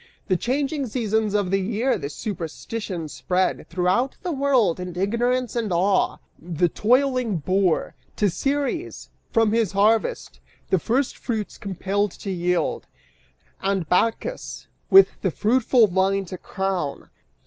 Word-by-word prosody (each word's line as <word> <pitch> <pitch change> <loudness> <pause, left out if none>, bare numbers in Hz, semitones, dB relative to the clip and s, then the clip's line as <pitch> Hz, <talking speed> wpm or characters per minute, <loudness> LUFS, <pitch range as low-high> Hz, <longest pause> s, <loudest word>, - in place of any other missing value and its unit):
The 185 - +4
changing 275 - -1
seasons 220 -2 0
of 200 -3 0
the 195 - +3
year 225 +6 0
the 140 - -4
superstition 175 +1 -5
spread 150 +7 -1
Throughout 185 +9 0
the 360 - -2
world; 265 - +2
and 180 -1 -6
Ignorance 240 +5 0
and 225 -4 -1
Awe, 185 +3 +2 0.2
the 175 +1 0
toiling 250 - +2
boor, 185 +2 +1 0.2
To 210 - +2
Ceres, 280 - -2 0.2
from 225 -2 +3
his 225 -4 +1
harvest, 220 - +1 0.3
the 190 - +4
first 250 +9 0
fruits 220 -4 -4
compelled 200 +1 -1
to 195 - -6
yield 180 -1 -1 0.7
And 195 -4 0
Bacchus 225 - -1 0.2
with 390 0 +6
the - - +1
fruitful 240 +1 +3
vine 195 +1 +1
to 185 +1 -7
crown. 190 -7 -3
205 Hz, 130 wpm, -23 LUFS, 185-245 Hz, 0.7 s, with